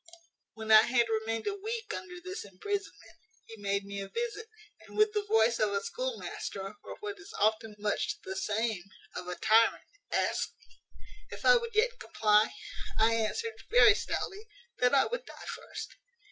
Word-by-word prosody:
"When 220 Hz, 0 st, -3 dB
I 215 Hz, 0 st, +11 dB
had 235 Hz, +1 st, +3 dB
remained 225 Hz, 0 st, -1 dB
a 410 Hz, -, 0 dB
week 445 Hz, +3 st, -4 dB
under 360 Hz, -1 st, -6 dB
this 370 Hz, +2 st, -6 dB
imprisonment, 400 Hz, -, -5 dB, 0.3 s
he 225 Hz, -2 st, -12 dB
made 200 Hz, 0 st, 0 dB
me 200 Hz, 0 st, -5 dB
a 195 Hz, -, -7 dB
visit, 455 Hz, -2 st, -3 dB, 0.3 s
and, -, -, -13 dB
with 425 Hz, 0 st, +4 dB
the 420 Hz, -, +1 dB
voice 230 Hz, -, +3 dB
of 210 Hz, -2 st, +2 dB
a 200 Hz, 0 st, 0 dB
schoolmaster, 340 Hz, -, -4 dB
or, -, -, -9 dB
what 410 Hz, -1 st, -5 dB
is 385 Hz, -, -12 dB
often 220 Hz, 0 st, +1 dB
much 210 Hz, 0 st, -1 dB
the 190 Hz, -, -5 dB
same, 205 Hz, 0 st, -1 dB, 0.3 s
of 180 Hz, -, -5 dB
a 180 Hz, -, -3 dB
tyrant, 225 Hz, +4 st, +4 dB, 0.3 s
asked -, -, 0 dB
me, -, -, -25 dB, 0.5 s
`If -, -, -8 dB
I -, -, +8 dB
would 465 Hz, -2 st, -1 dB
yet 485 Hz, +3 st, +2 dB
comply?' 210 Hz, 0 st, +3 dB, 0.5 s
I 225 Hz, +1 st, +4 dB
answered, 230 Hz, -, -1 dB
very 455 Hz, -3 st, +8 dB
stoutly, 415 Hz, 0 st, -4 dB, 0.3 s
`That 250 Hz, +1 st, +4 dB
I 270 Hz, -, +5 dB
would -, -, -3 dB
die -, -, -11 dB
first.' -, -, -7 dB
230 Hz, 175 wpm, -31 LUFS, -, 0.5 s, I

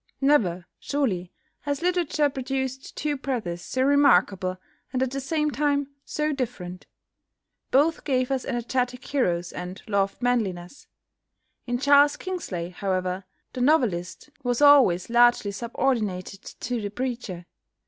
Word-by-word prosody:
Never, 205 Hz, -12 st, +2 dB
surely, 205 Hz, -12 st, -1 dB, 0.3 s
has 285 Hz, +2 st, -3 dB
literature 350 Hz, -4 st, +2 dB
produced 265 Hz, 0 st, -4 dB
two 295 Hz, 0 st, -1 dB
brothers 225 Hz, -11 st, -3 dB
so 260 Hz, +7 st, -1 dB
remarkable, 195 Hz, -10 st, +3 dB, 0.3 s
and 260 Hz, 0 st, 0 dB
at 260 Hz, -, -2 dB
the 275 Hz, -, -3 dB
same 300 Hz, +2 st, 0 dB
time 285 Hz, -1 st, 0 dB
so 300 Hz, 0 st, -1 dB
different. 200 Hz, -9 st, -5 dB, 0.8 s
Both 300 Hz, +5 st, +3 dB
gave 255 Hz, -2 st, 0 dB
us 265 Hz, -2 st, 0 dB
energetic 250 Hz, 0 st, -2 dB
heroes, 175 Hz, -11 st, 0 dB
and 180 Hz, +2 st, -6 dB
loved 200 Hz, -2 st, 0 dB
manliness. 220 Hz, -5 st, -2 dB, 0.8 s
In 245 Hz, 0 st, 0 dB
Charles 285 Hz, +2 st, +5 dB
Kingsley, 200 Hz, -, -4 dB
however, 185 Hz, 0 st, -2 dB, 0.3 s
the 255 Hz, -, -4 dB
novelist 245 Hz, -, +1 dB
was 245 Hz, -1 st, 0 dB
always 275 Hz, -12 st, +6 dB
largely 240 Hz, -3 st, +4 dB
subordinated 210 Hz, -4 st, -2 dB, 0.2 s
to 245 Hz, -1 st, -2 dB
the 205 Hz, -, -3 dB
preacher. 230 Hz, -6 st, -4 dB
245 Hz, 125 wpm, -25 LUFS, 190-280 Hz, 0.8 s, always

